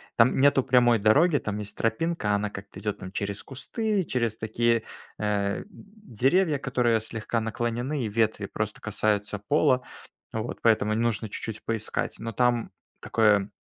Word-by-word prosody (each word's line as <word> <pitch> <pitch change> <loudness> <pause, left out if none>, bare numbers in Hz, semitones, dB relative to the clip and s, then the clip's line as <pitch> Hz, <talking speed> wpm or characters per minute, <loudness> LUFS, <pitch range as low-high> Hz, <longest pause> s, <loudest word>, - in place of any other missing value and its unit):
там 115 +3 +4
нету 135 -1 +5
прямой 125 -2 +4
дороги, 145 - +4
там 105 -4 -3
есть 105 0 -7
тропинка, 115 0 0
она 105 0 0
как-то 100 0 -9
идет 105 -2 -3
там 95 - -8
через 100 0 -4
кусты, 205 - -2
через 120 -6 -1
такие, 115 +1 +1 0.4
э, 100 -1 0
деревья, 190 - 0
которые 120 -4 +1
слегка 110 +1 -3
наклонены, 120 +5 -2
и - - -1
ветви 110 +1 0
просто - - -4
касаются 105 -1 -1
пола. 130 +3 +2 0.5
Вот, 110 +1 -4
поэтому 110 -2 +3
нужно 115 -1 0
чуть-чуть 110 +2 -5
поискать. 115 -2 -2
Но 115 0 -4
там 120 +1 +1 0.3
такое 105 -3 +2
115 Hz, 145 wpm, -26 LUFS, 105-130 Hz, 0.5 s, нету